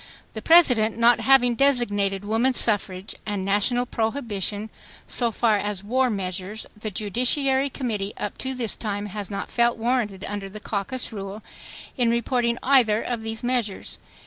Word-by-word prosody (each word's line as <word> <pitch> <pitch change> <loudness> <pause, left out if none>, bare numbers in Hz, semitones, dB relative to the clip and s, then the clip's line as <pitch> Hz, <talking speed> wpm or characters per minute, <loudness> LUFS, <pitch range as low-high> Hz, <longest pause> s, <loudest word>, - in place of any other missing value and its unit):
The 220 - -6
President, 250 -11 +5
not 235 +1 +5
having 260 -3 +4
designated 205 -7 +2
woman 230 +5 +1
suffrage 195 -4 0
and 205 -3 -3
national 210 +5 +1
prohibition 220 -4 -2 0.4
so 240 -2 +1
far 225 -1 +2
as 205 -1 -4
war 255 +4 +1
measures, 195 +1 -4
the 215 +1 -5
judiciary 255 +7 +2
committee 215 -7 -3
up 205 - -5
to 265 0 -3
this 235 -5 -1
time 205 -2 -4
has 205 -1 -6
not 200 - -5
felt 235 0 +2
warranted 225 -5 -1
under 200 -1 -5
the 215 +2 -8
caucus 215 +4 -2
rule, 200 +1 -7 0.5
in 245 -2 +2
reporting 235 0 0
either 245 -6 +4
of 240 -2 -3
these 225 0 -4
measures. 240 -5 -2
220 Hz, 150 wpm, -24 LUFS, 205-245 Hz, 0.5 s, President